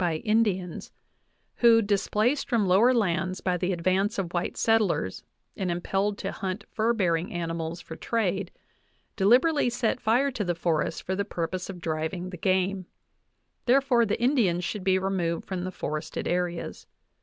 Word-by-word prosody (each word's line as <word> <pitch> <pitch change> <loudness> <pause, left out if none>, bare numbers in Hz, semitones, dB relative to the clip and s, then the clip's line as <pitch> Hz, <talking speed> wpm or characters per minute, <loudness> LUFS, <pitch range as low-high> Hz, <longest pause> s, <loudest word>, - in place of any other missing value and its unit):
VIII 180 - +2
by 165 - 0
Indians, 205 -6 0 0.7
who, 230 -1 +6
displaced 210 +6 +1
from 230 -5 +2
lower 200 +7 +5
lands 185 -5 0
by 180 -1 0
the 180 +1 -1
advance 185 +5 0
of 180 -3 -3
white 175 -1 -2
settlers 215 - +1 0.3
and 190 -2 -2
impelled 195 +4 -1
to 195 - -4
hunt 190 +1 -4
fur 225 +1 +1
bearing 180 -6 0
animals 165 0 -4
for 160 - -9
trade, 195 -4 -1 0.7
deliberately 245 +8 +4
set 240 +1 -1
fire 250 +6 +2
to 230 -5 -3
the 175 -2 -1
forests 165 -1 0
for 190 - -3
the 200 - 0
purpose 180 0 -4
of 185 -2 -7
driving 165 +3 -3
the 180 - -7
game; 185 +1 0 0.8
therefore 255 -1 +4
the 210 -2 -1
Indians 230 -9 +2
should 205 +1 -3
be 190 0 +3
removed 185 -3 -1
from 185 -2 -4
the 185 - -4
forested 155 -2 -4
areas. 175 -1 -2
190 Hz, 160 wpm, -27 LUFS, 175-220 Hz, 0.8 s, who